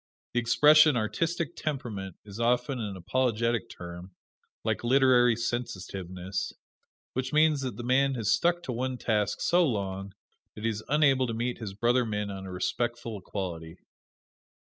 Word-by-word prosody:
The 120 - +2
expression 150 +4 +6
"artistic 165 +9 -1
temperament" 110 - -4
is 100 +1 -9
often 125 +2 +1
an 105 -4 -4
apologetic 115 +2 0
term, 90 +1 -9 0.5
like - - -1
"literary 125 -1 +5
sensitiveness," 95 -5 -4 0.6
which 130 0 -2
means 155 -1 +4
that 125 -6 -4
the 120 - -5
man 135 +2 +2
has 110 -3 0
stuck 175 0 +2
to - - -4
one 125 +2 -2
task 105 -4 0
so 175 +1 +4
long 100 - -2 0.4
that 105 - -9
he 115 - +2
is 110 0 -6
unable 140 -3 +4
to 115 - -3
meet 120 +2 -2
his 100 -4 -6
brother 120 +4 +2
men 105 -2 -3
on 95 -1 -7
a - - -7
respectful 115 +4 -2
equality. 85 -4 -6
120 Hz, 150 wpm, -28 LUFS, 100-130 Hz, 0.6 s, expression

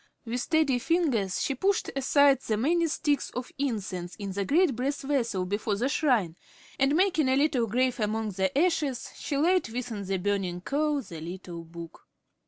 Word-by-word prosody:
With 240 +2 -2
steady 305 -4 +2
fingers 255 - +1
she 275 - 0
pushed 385 +9 0
aside 275 0 +4
the 215 -4 -1
many 335 +8 +2
sticks 295 -2 0
of 250 0 -5
incense 190 -10 -3
in 200 -2 -5
the 200 +1 -2
great 310 - +3
brass 275 +4 -2
vessel 235 -9 0
before 205 +2 -1
the 245 +7 0
shrine, 240 - +1 0.4
and 275 +2 +3
making 345 -6 +3
a 260 - +3
little 270 -5 +2
grave 250 +3 +1
among 215 0 -1
the 190 +5 -1
ashes, 300 -6 +1
she 285 - -3
laid 350 -1 +2
within 230 -3 -4
the 195 0 -1
burning 185 -2 -1
coal 290 +4 0
the 165 -7 -9
little 175 0 -7
book. 165 0 -11
250 Hz, 175 wpm, -28 LUFS, 200-290 Hz, 0.4 s, aside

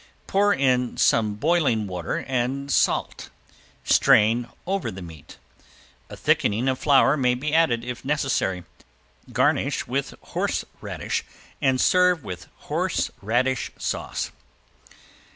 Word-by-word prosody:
Pour 205 +1 +2
in 125 -6 +1
some 105 -2 +2
boiling 140 -4 +1
water 90 -4 -4
and 135 +2 -2
salt. - - 0 0.5
Strain 120 - +4 0.2
over 195 +1 -1
the 95 - -8
meat. 80 -4 -12 0.7
A - - -9
thickening 110 +5 +1
of 130 -1 0
flour 140 -1 +4
may 125 -4 +2
be 145 +4 -3
added 130 -8 +3
if 125 -1 -6
necessary. 135 -10 -1 0.7
Garnish - - +1
with - - -3
horseradish - - -3 0.4
and 130 -1 +2
serve 180 -2 +3
with 90 -5 -7
horseradish 120 +5 -1
sauce. - - -3
130 Hz, 110 wpm, -24 LUFS, 110-140 Hz, 0.7 s, Strain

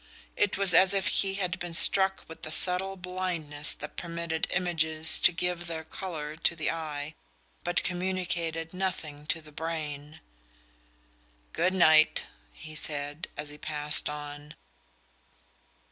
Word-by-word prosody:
It 205 - +1
was 195 -2 +3
as 190 +3 +6
if 195 -1 0
he 195 -1 +2
had 185 -3 -2
been 175 -1 -5
struck 190 +2 +5
with 165 - -12
a - - -5
subtle 190 +3 +3
blindness 180 -5 -1
that 150 - -9
permitted 170 -1 -3
images 160 -3 +2
to - - +6
give 175 0 -2
their 160 -1 -4
colour 160 -3 -6
to 170 +1 +1
the 160 - -1
eye 155 -2 -5 0.5
but 175 0 0
communicated 175 -3 -2
nothing 165 -6 -4
to 160 0 -1
the 155 - -14
brain. 150 -1 -5 1.3
"Good 185 +1 +1
night," 155 -4 +5 0.3
he 155 - -11
said, 145 0 -3
as 150 0 -4
he 150 - -11
passed 150 -1 0
on. 145 0 -8
165 Hz, 135 wpm, -28 LUFS, 150-180 Hz, 1.3 s, as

